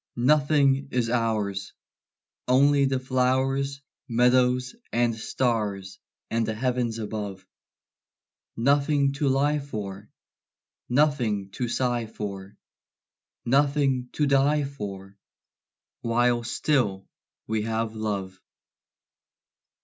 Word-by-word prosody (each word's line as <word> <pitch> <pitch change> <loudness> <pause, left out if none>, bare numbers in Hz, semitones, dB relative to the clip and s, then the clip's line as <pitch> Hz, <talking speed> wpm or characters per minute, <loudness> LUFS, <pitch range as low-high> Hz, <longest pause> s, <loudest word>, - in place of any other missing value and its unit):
Nothing 140 +1 +3
is 120 -2 0
ours, 105 -5 -1 0.7
Only 140 +2 +4
the 135 -1 0
flowers, 130 +2 0 0.3
Meadows, 125 - +2 0.2
and 120 0 +2
stars, 105 -5 -2 0.3
and 115 0 +1
the 110 0 -2
heavens 125 -1 -1
above; 105 -3 -5 1.1
Nothing 140 +2 +2
to 140 +1 -1
lie 145 +3 +2
for, 105 -7 -7 0.8
Nothing 120 -8 +1
to 120 +5 -3
sigh 120 -1 -1
for, 100 -2 -7 0.9
Nothing 135 -1 +2
to 150 - +1
die 140 +2 +3
for 100 -8 -7 0.9
While 120 +1 +2
still 115 -7 0 0.4
we 110 0 -1
have 110 0 -2
love. 100 -3 -4
120 Hz, 90 wpm, -26 LUFS, 110-135 Hz, 1.1 s, Only